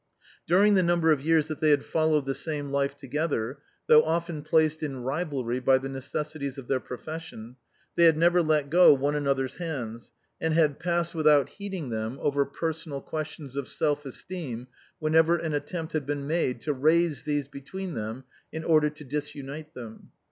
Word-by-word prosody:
During 200 +5 +5
the 190 - +5
number 170 -2 +3
of 150 -3 +2
years 160 0 +3
that 155 -1 -5
they 155 -1 +3
had 145 -2 +3
followed 155 -3 +1
the 135 - -1
same 145 -2 -3
life 140 0 0
together, 140 -2 -2 0.3
though 155 - +7
often 165 -1 -2
placed 155 +1 +2
in 135 -5 -4
rivalry 135 -4 -2
by 130 +1 +4
the 135 +1 -5
necessities 140 +1 -4
of 135 -3 -8
their 135 - +1
profession, 125 -3 -8 0.4
they 170 - +5
had 160 -2 +6
never 175 +2 +4
let 155 -3 +1
go 175 -3 +8
one 140 +2 0
another's 140 -3 -1
hands, 120 -9 -5 0.3
and 160 -1 +1
had 155 -4 +3
passed 170 0 -1
without 150 -4 +4
heeding 195 -8 -5
them 110 +2 -3
over 140 -1 +1
personal 160 0 -4
questions 150 -2 -6
of 140 -2 -3
self 145 -1 0
esteem 135 -3 -6 0.3
whenever 160 +2 +3
an 160 -2 -3
attempt 160 +3 -4
had 150 -3 -2
been 145 -1 -2
made 150 -4 0
to 150 - -1
raise 155 0 +2
these 145 -1 -1
between 150 +7 -7
them 110 +2 -5 0.3
in 160 0 -5
order 155 -2 +4
to 150 0 -12
dis 145 +2 -4
unite 145 +2 -8
them. 115 -3 -10
150 Hz, 180 wpm, -27 LUFS, 135-160 Hz, 0.4 s, go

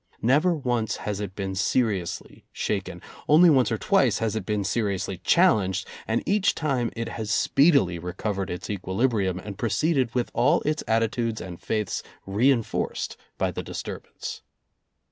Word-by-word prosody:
Never 150 +9 +3
once 120 -6 -1
has 105 -1 -4
it 100 -2 -5
been 95 -1 -3
seriously 100 -2 -1
shaken. - - -3 0.3
Only 165 +3 +7
once 130 -4 +3
or - - +1
twice - - +3
has 110 -1 -1
it 110 -4 -4
been 105 -1 0
seriously 100 -4 -1
challenged, 95 - +3 0.2
and 110 +1 0
each 200 0 +2
time 135 -7 0
it 115 0 -3
has 110 -2 -5
speedily 130 - +3
recovered 95 +3 -3
its 90 - -5
equilibrium 100 -1 0
and 100 +1 -8
proceeded 125 +3 +1
with 125 -1 0
all 145 +8 +3
its 155 +1 -1
attitudes 115 0 0
and 90 -2 -8
faiths 105 -2 -2 0.2
reenforced 115 +4 0 0.2
by - - 0
the - - -4
disturbance. - - -7
110 Hz, 145 wpm, -25 LUFS, 95-130 Hz, 0.3 s, Only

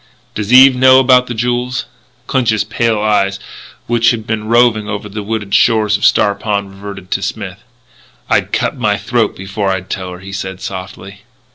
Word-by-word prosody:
"Does 105 0 -4
Eve 130 +1 +8
know 130 +1 +6
about 125 -1 +4
the 120 - -5
jewels?" 125 +2 -2 0.4
Clinch's 115 -6 +1
pale 115 0 -1
eyes, 100 -2 +1 0.5
which 115 0 +2
had 110 -3 -2
been 110 -1 -3
roving 115 -2 +2
over 105 0 -4
the 105 +1 -6
wooded 105 -1 -4
shores 110 -2 +3
of - - -1
Star 100 - +3
Pond, 100 -1 -3
reverted 95 -1 -10
to - - -1
Smith. - - -5 0.7
"I'd - - 0
cut - - -1
my - - 0
throat - - -1
before 95 +1 -3
I'd 95 -1 -3
tell 95 -2 -4
her," 90 - -10
he 95 +1 -10
said 95 -1 -5
softly. 95 +1 -8
105 Hz, 175 wpm, -15 LUFS, 100-120 Hz, 0.7 s, Eve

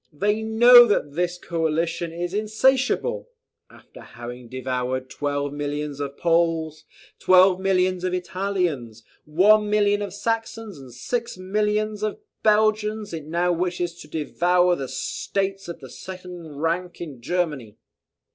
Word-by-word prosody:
They 205 +8 0
know 240 +2 +8
that 150 -9 0
this 175 +2 -1
coalition 165 0 -2
is 175 +2 -4
insatiable! 260 - +1 0.4
After - - -16
having 120 +1 -9
devoured 130 0 -3
twelve 145 -1 -2
millions 145 0 -4
of 140 -1 -5
Poles, 165 -2 0 0.3
twelve 185 0 +5
millions 185 -1 +1
of 185 - 0
Italians, 175 - -2 0.2
one 210 +7 +4
million 205 -1 +2
of 200 -2 -4
Saxons, 225 -4 -3
and 130 -2 -12
six 235 - -4
millions 210 +2 -1
of 215 -1 -2 0.2
Belgians, 215 -1 +1
it 155 -2 -6
now 175 +2 +1
wishes 175 0 -1
to - - -11
devour 175 +4 +1
the 135 -5 -5
states 195 +8 -3
of 170 -2 -8
the 130 - -10
second 180 -5 -9
rank 170 +2 -2
in 145 -8 -8
Germany. 150 - -2
180 Hz, 130 wpm, -23 LUFS, 150-205 Hz, 0.4 s, know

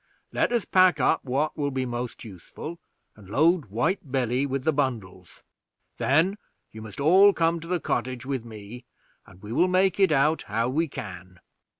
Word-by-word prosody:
Let - - +1
us 240 -3 0
pack 185 -1 +4
up 160 - +2
what 140 +4 -1
will 145 -2 -1
be 130 -1 -2
most 120 -1 -5
useful, 115 - -9 0.4
and 100 -3 -16
load 160 - +3
White 135 - -2
Billy 130 +1 0
with 135 -1 -3
the 160 - +2
bundles; 110 - -4 0.5
then 170 +9 +2 0.3
you 110 - -10
must 110 +2 -10
all 190 +7 +6
come 165 -1 +1
to 165 - -10
the 180 0 0
cottage 130 -4 -3
with 135 -3 -3
me, 115 +2 -10 0.4
and 90 +2 -18
we 105 - -8
will 180 - +3
make 185 +1 +2
it 190 -4 +4
out 150 +2 +2
how 115 +2 0
we 160 +5 0
can." 95 - -9
135 Hz, 180 wpm, -25 LUFS, 115-165 Hz, 0.5 s, all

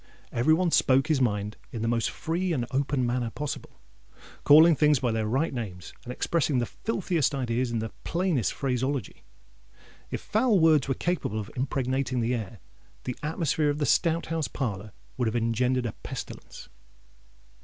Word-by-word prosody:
Every 140 +7 +3
one 175 0 +1
spoke 135 +2 +3
his 150 -4 +2
mind 105 -3 0
in 115 -2 -4
the - - 0
most 115 -1 +1
free 175 +2 -2
and 125 -6 -1
open 135 -1 0
manner 120 -1 -1
possible,—calling 145 - +1
things 150 0 +4
by 120 -2 0
their 110 -1 -1
right 135 +9 0
names—and 110 0 -7
expressing 150 +1 0
the 120 - +1
filthiest 170 - -1
ideas 125 -1 -1
in 115 - -2
the 110 -1 -3
plainest 170 - 0
phraseology. 130 -2 -2 0.9
If - - -3
foul 220 -2 +2
words 155 -5 +4
were 135 - 0
capable 175 - -1
of 105 0 -6
impregnating 130 0 -1
the 120 +1 0
air, 110 -2 -4 0.5
the 125 - -4
atmosphere 155 -1 0
of 145 - -1
the 150 - 0
Stout 165 +4 +2
House 160 -1 -2
parlour 105 -6 -4 0.3
would 125 -2 +1
have 110 - -1
engendered 120 +2 +1
a 115 - -1
pestilence. - - -8
130 Hz, 160 wpm, -27 LUFS, 115-155 Hz, 0.9 s, things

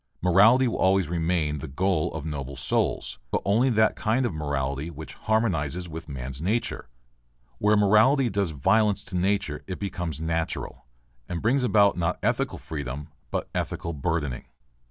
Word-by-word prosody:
Morality 105 +9 +5
will 115 - -2
always 95 -2 +3
remain 80 -3 0
the 80 - -6
goal 85 +3 0
of 80 -2 -5
noble 70 -3 -5
souls, 65 0 -1
but - - 0
only 115 +7 +3
that 110 -2 +3
kind 120 +4 +1
of 120 - -1
morality 70 -1 -2
which 80 -3 -9
harmonizes 90 -7 0
with 80 -1 -8
man's 65 0 -6
nature. 100 - -1 0.7
Where 105 +1 +4
morality 110 +7 +5
does 100 -4 0
violence 95 +8 +2
to - - -7
nature 95 -4 0
it 95 - -4
becomes 90 -6 -4
natural, 80 -4 -3 0.4
and 85 - -2
brings 125 +7 +2
about 100 -5 +4
not 85 +1 0
ethical - - 0
freedom 70 0 -6 0.2
but - - -2
ethical 85 - -3
burdening. 75 -3 -2
90 Hz, 155 wpm, -26 LUFS, 75-105 Hz, 0.7 s, Morality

